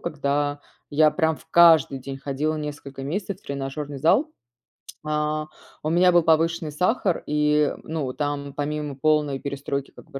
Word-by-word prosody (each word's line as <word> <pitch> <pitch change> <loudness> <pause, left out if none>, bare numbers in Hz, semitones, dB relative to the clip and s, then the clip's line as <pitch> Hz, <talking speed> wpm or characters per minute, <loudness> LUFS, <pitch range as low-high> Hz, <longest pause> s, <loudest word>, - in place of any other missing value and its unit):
когда 145 -2 -1 0.3
я 155 +1 +4
прям 160 -3 +1
в - - -18
каждый 165 -5 +6
день 135 +1 -7
ходила 140 +3 -2
несколько 145 -2 -6
месяцев 190 +6 -4
в - - -32
тренажерный 140 +1 -5
зал. 210 - +3 0.8
А, 150 0 -1 0.3
у 155 - -2
меня 180 +2 +4
был 175 - +5
повышенный 165 0 +2
сахар 180 +4 0
и, 150 0 +2
ну 150 -5 -3
там 140 0 -3
помимо 150 0 -3
полной 150 -1 +1
перестройки 140 -1 -4
как - - -16
бы 135 - -6
150 Hz, 155 wpm, -24 LUFS, 140-160 Hz, 0.8 s, каждый